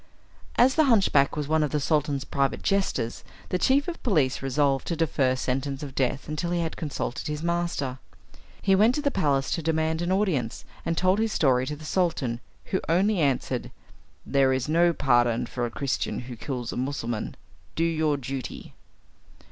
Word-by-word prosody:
As 255 +2 +5
the 315 0 +4
hunchback 195 - +4
was 150 -2 -2
one 160 +1 +2
of 150 - +1
the 150 - 0
Sultan's 145 -2 0
private 140 -1 -1
jesters, 190 - 0 0.3
the 180 - 0
chief 275 +6 +3
of 350 - -5
police 150 - +1
resolved 135 0 +1
to 170 - -1
defer 140 -5 +1
sentence 135 +2 -2
of 140 -2 -7
death 135 +1 -1
until 155 +3 -2
he 175 0 0
had 165 -1 -3
consulted 145 -5 -4
his 150 +1 -4
master. 170 -7 -1 0.6
He 195 - +4
went 215 +6 +5
to 295 - -2
the 285 - +2
palace 140 - +1
to 165 - 0
demand 160 +1 0
an 175 +1 -1
audience, 180 - 0 0.2
and 165 0 0
told 185 +2 +3
his 225 -1 0
story 130 -3 +2
to 150 - -3
the 155 +1 -11
Sultan, 155 -10 0 0.3
who 190 - -1
only 190 +4 +3
answered, 140 -4 0 0.6
"There 135 -1 +3
is 130 0 0
no 170 +3 +4
pardon 120 -5 +2
for 120 0 -3
a - - -6
Christian 135 +2 -2
who 125 0 -8
kills 120 0 -4
a - - -5
Mussulman. 125 -4 -3 0.4
Do 165 - +1
your 160 -3 +1
duty." 135 0 -6
150 Hz, 180 wpm, -26 LUFS, 135-175 Hz, 0.6 s, As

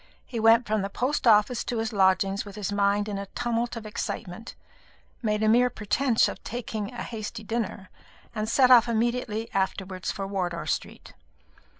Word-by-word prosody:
He 235 - -5
went 225 +2 +5
from 215 -1 0
the 195 - -3
post 255 +5 -1
office 215 +2 +4
to 240 - -2
his 225 +1 -2
lodgings 195 0 +2
with 200 -1 -11
his 205 -2 -3
mind 205 +1 +1
in 200 -2 -3
a 200 - -6
tumult 240 0 -1
of 230 -2 -7
excitement, 210 0 -5 0.7
made 210 -2 0
a - - +3
mere 245 +3 +5
pretence 230 +3 +1
of - - -7
taking 220 -3 -4
a - - -6
hasty 220 -1 -6
dinner, 215 -3 -4 0.4
and 215 -1 -2
set 255 +1 +4
off 240 -1 +7
immediately 230 -1 -1
afterwards 190 -1 -2
for 195 - -4
Wardour 180 -3 -3
Street. - - -4
215 Hz, 175 wpm, -26 LUFS, 200-235 Hz, 0.7 s, off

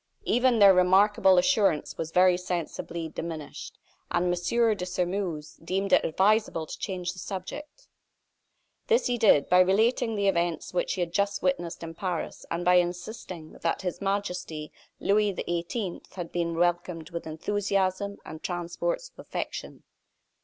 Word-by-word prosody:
Even 245 0 +3
their 200 -2 +8
remarkable 190 +1 +5
assurance 195 - +2
was 160 - -4
very 180 +1 +5
sensibly 170 -2 -4
diminished; 160 -1 -7 0.3
and 175 +1 +1
M. 225 +6 +2
de 180 - -5
Sairmeuse 180 -3 -3
deemed 190 +3 -1
it - - +6
advisable 195 -1 +2
to - - -8
change 185 -3 -3
the 185 - -11
subject. 290 - -7 1.0
This 470 0 +3
he 245 -1 0
did, 200 -10 +5
by 180 - +5
relating 220 +5 +3
the 200 -1 +1
events 175 -3 0
which 180 - 0
he 185 - -2
had 170 -1 -2
just 200 +1 0
witnessed 175 -2 -1
in 165 0 -6
Paris, 175 -1 -4
and 170 +1 -3
by 180 0 +6
insisting 175 -1 -3
that 165 +3 -1
His 180 +1 -3
Majesty, 180 -6 -3 0.3
Louis 205 0 +2
XVIII., 175 +3 -3
had 175 -3 -6
been 170 -1 -1
welcomed 175 -1 0
with 170 -1 -5
enthusiasm 195 +3 -1
and 160 0 -8
transports - - -3
of - - -25
affection. - - -6
180 Hz, 145 wpm, -27 LUFS, 170-200 Hz, 1.0 s, their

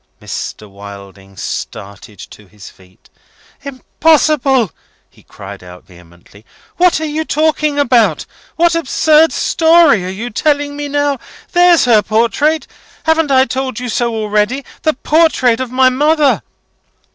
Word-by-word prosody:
Mr. 105 - -7
Wilding 100 -1 -13
started 100 +3 -8
to 105 +3 -14
his 100 0 -14
feet. 95 0 -24 0.5
"Impossible!" 280 - +1 0.4
he - - -23
cried - - -12
out, 90 0 -13
vehemently. 90 +2 -19 0.3
"What 360 -2 +3
are 315 - -3
you 310 +1 -3
talking 305 -1 0
about? 245 -5 +2 0.3
What 340 0 +2
absurd 315 0 +2
story 320 - +3
are 180 - -5
you 215 +5 -6
telling 285 +3 -1
me 290 0 -5
now? 285 -1 -1 0.3
There's 350 -3 +4
her 225 -4 +4
portrait! 235 +9 0 0.4
Haven't 320 -1 +1
I 260 -1 +4
told 260 -3 -4
you 250 0 -5
so 235 0 -1
already? 215 +5 -1 0.2
The 310 - +1
portrait 285 -6 +1
of 260 -1 -4
my 260 0 +3
mother!" 295 +2 +1
260 Hz, 135 wpm, -14 LUFS, 205-305 Hz, 0.5 s, There's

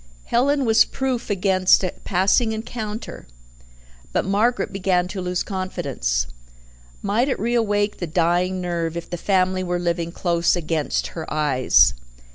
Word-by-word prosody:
Helen 275 +3 +1
was 225 -1 +6
proof 260 -3 -3
against 190 -1 +3
a 185 - -2
passing 200 +5 +2
encounter 220 0 -6 0.8
but - - 0
Margaret 210 +3 +1
began 185 -2 +1
to 190 0 -5
lose 180 0 -1
confidence. - - -2 0.8
Might 220 +7 +1
it - - 0
reawake 210 -2 0
the 175 - -4
dying 175 +3 +1
nerve 170 -2 -2
if 170 - -6
the - - -1
family 185 0 +1
were 175 -1 -1
living 170 -1 -2
close 170 -1 +1
against 160 -3 -1
her 160 -2 -7
eyes? 145 -4 +4
185 Hz, 135 wpm, -22 LUFS, 170-210 Hz, 0.8 s, was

